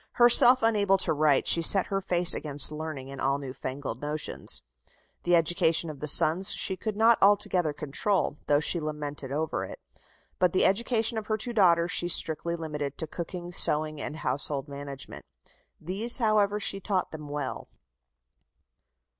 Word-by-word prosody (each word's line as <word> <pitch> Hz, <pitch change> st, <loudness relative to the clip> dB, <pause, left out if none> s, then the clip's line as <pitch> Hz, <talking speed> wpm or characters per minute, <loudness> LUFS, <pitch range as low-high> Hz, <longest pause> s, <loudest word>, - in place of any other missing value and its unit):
Herself 245 Hz, +1 st, +6 dB
unable 205 Hz, -4 st, +2 dB
to 185 Hz, -, 0 dB
write, 150 Hz, -2 st, +1 dB
she 170 Hz, -, +5 dB
set 190 Hz, +3 st, +3 dB
her 195 Hz, -, -1 dB
face 180 Hz, -1 st, +1 dB
against 145 Hz, -1 st, +3 dB
learning 150 Hz, -3 st, -7 dB
and 140 Hz, -, -9 dB
all 135 Hz, +1 st, 0 dB
new 135 Hz, -2 st, -8 dB
fangled 130 Hz, -2 st, -7 dB
notions. 150 Hz, +1 st, -2 dB, 0.6 s
The 175 Hz, 0 st, +3 dB
education 165 Hz, -1 st, +1 dB
of 145 Hz, -, -13 dB
the 150 Hz, -, -5 dB
sons 165 Hz, +6 st, +4 dB
she 190 Hz, -, +3 dB
could 210 Hz, +2 st, -6 dB
not 225 Hz, +1 st, +3 dB
altogether 195 Hz, -5 st, +2 dB
control, 150 Hz, +3 st, -3 dB
though 145 Hz, 0 st, +2 dB
she 165 Hz, +3 st, +1 dB
lamented 150 Hz, -3 st, -7 dB
over 155 Hz, +2 st, -3 dB
it, -, -, -10 dB, 0.6 s
but 180 Hz, -2 st, +1 dB
the 185 Hz, -, +3 dB
education 225 Hz, +2 st, +1 dB
of 215 Hz, -, -12 dB
her 215 Hz, -, -1 dB
two 240 Hz, +3 st, -6 dB
daughters 175 Hz, -5 st, +2 dB
she 175 Hz, -, +3 dB
strictly 170 Hz, 0 st, -1 dB
limited 150 Hz, -4 st, -6 dB
to -, -, -3 dB
cooking, 175 Hz, +2 st, -8 dB
sewing, 155 Hz, -3 st, +3 dB
and 150 Hz, -, -5 dB
household 140 Hz, +1 st, -2 dB
management. 140 Hz, -1 st, -8 dB, 0.6 s
These, 200 Hz, +8 st, +1 dB
however, 210 Hz, -3 st, 0 dB
she 195 Hz, -1 st, 0 dB
taught 190 Hz, -2 st, -3 dB
them 150 Hz, -2 st, -10 dB
well. 140 Hz, -5 st, -6 dB
165 Hz, 165 wpm, -26 LUFS, 145-195 Hz, 0.6 s, Herself